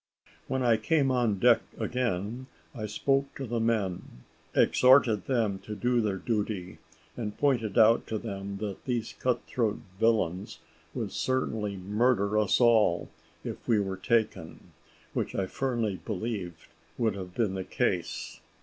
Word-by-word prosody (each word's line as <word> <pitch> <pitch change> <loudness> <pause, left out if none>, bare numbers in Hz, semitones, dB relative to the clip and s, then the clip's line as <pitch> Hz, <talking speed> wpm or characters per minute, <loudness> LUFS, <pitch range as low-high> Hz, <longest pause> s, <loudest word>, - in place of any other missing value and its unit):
When 130 0 -1
I 115 -2 +4
came 135 +5 +2
on 120 -5 +1
deck 120 +3 +5 0.2
again 120 0 -2 0.3
I 110 -5 -4
spoke 135 +6 0
to 135 - -5
the 120 -1 -2
men, 105 - -2 0.3
exhorted 125 -6 +5
them 110 -7 +1
to 105 +2 -7
do 120 +2 +1
their 105 -3 -1
duty, 105 -4 -3 0.4
and 105 -3 -5
pointed 120 -8 +1
out 115 0 +5
to 110 - -2
them 100 -2 -5
that 100 -2 -5
these 120 -3 -2
cut 125 -1 0
throat 110 -4 0 0.2
villains 105 -5 +1 0.4
would - - -3
certainly 110 -6 -1
murder 105 +2 +1
us 105 -3 +2
all 110 -8 +4 0.3
if - - -7
we 110 -3 +4
were 95 -1 -2
taken, 105 -5 -1 0.4
which - - -2
I 95 - 0
firmly 115 -4 -2
believe 95 -5 -4 0.3
would 115 -3 +1
have 90 -2 -8
been 110 -5 +1
the 95 -1 -3
case. - - -2
110 Hz, 145 wpm, -29 LUFS, 100-120 Hz, 0.4 s, deck